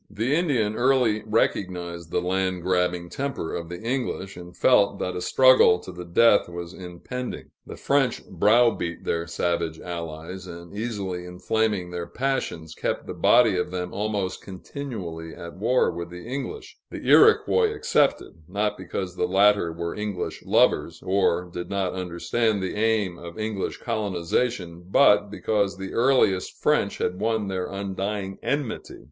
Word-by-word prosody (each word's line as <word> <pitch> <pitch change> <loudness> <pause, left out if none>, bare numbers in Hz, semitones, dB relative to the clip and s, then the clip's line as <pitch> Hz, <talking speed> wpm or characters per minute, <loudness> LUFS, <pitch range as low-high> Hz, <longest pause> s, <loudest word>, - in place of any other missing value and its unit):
The 115 +6 -1
Indian 125 -11 +1
early 120 -4 +3
recognized 90 -6 -1
the 90 - -1
land 95 -1 -1
grabbing 90 -1 0
temper 135 -10 -4
of 85 -1 -5
the 90 - -6
English, 115 -5 -3
and 90 0 -11
felt 100 -6 +4
that 90 - -3
a 90 - -3
struggle 130 -2 +6
to 90 - -10
the 90 0 -8
death 100 +3 +4
was 85 0 -7
impending. 95 +8 -7 0.2
The - - -8
French 135 -3 +1
browbeat 105 -2 +2
their 85 0 -1
savage 85 -1 -1
allies, 85 +1 -6
and, 85 +2 -10
easily 100 -5 -4
inflaming 95 +1 -1
their 85 -1 -4
passions, 115 - -2
kept - - -3
the - - -5
body 115 -5 +4
of 90 - -1
them 90 0 -4
almost 100 -2 -2
continually 95 -6 -7
at 85 +1 -9
war 120 +6 +2
with 85 0 -6
the 90 +2 -10
English 140 - -6
the - - -7
Iroquois 445 0 +5
excepted, 150 - +1
not 105 +2 -1
because 90 0 -5
the - - 0
latter 100 -2 +4
were 85 +1 -4
English 105 -3 -4
lovers, - - +2
or 95 -2 +2
did 90 0 -7
not 100 -2 -1
understand 95 +5 -1
the 95 - -2
aim 105 -5 0
of 85 0 -9
English 110 -3 -3
colonization, 90 -2 -2
but 105 -3 +5
because 100 -1 -1
the 95 0 -6
earliest 120 -7 +2
French - - +1
had 90 +1 -2
won 110 -1 0
their 95 -1 -2
undying 100 0 -4
enmity. 140 -5 -3
95 Hz, 150 wpm, -25 LUFS, 90-110 Hz, 0.2 s, struggle